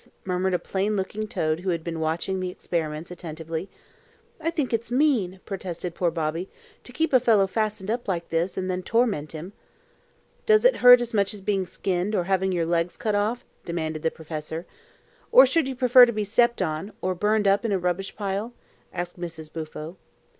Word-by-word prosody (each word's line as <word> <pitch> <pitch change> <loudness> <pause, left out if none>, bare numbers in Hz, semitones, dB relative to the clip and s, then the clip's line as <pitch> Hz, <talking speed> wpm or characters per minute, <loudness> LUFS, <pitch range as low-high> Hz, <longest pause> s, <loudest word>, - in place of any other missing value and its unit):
murmured 185 0 0
a - - +3
plain 200 +4 -1
looking 210 +2 -3
toad 155 -5 -1
who 185 +1 -3
had 170 -2 -1
been 165 -1 -4
watching 165 +4 -1
the 185 0 -2
experiments 165 -2 -4
attentively. 165 0 -6 0.7
"I 325 0 -1
think 300 -7 -2
it's 230 +1 -1
mean," 240 -9 +1
protested 180 -3 -5
poor 175 0 +1
Bobby, 165 +2 -3 0.4
"to - - -9
keep 320 +4 -1
a 255 - +7
fellow 220 -5 +4
fastened 210 0 -2
up 240 0 -3
like 170 -3 -2
this, 165 +3 -1
and 185 -1 -2
then 185 0 -2
torment 205 -8 0
him." 165 +5 -7 0.9
"Does 435 +2 +5
it - - +5
hurt 245 0 +9
as 235 -1 -4
much 200 0 +1
as 200 - -10
being 195 -2 0
skinned, 190 +3 -1
or 180 - +1
having 190 +1 +1
your 170 -2 0
legs 170 +1 0
cut 215 - -1
off?" 210 +4 0 0.2
demanded 160 -2 -3
the 160 - +1
professor. 160 +1 -6 0.7
"Or - - +9
should 325 -5 +1
you 265 - -4
prefer 250 0 +7
to - - 0
be 215 -2 -2
stepped 235 +1 +2
on, 160 +4 -3
or 185 - +1
burned 210 +3 +1
up 195 +3 +3
in 225 - -1
a 195 - +2
rubbish 180 +2 -2
pile?" 205 +3 -3 0.4
asked 175 0 -5
Mrs. 160 -3 -7
Bufo. 160 +2 -7
190 Hz, 195 wpm, -25 LUFS, 170-215 Hz, 0.9 s, hurt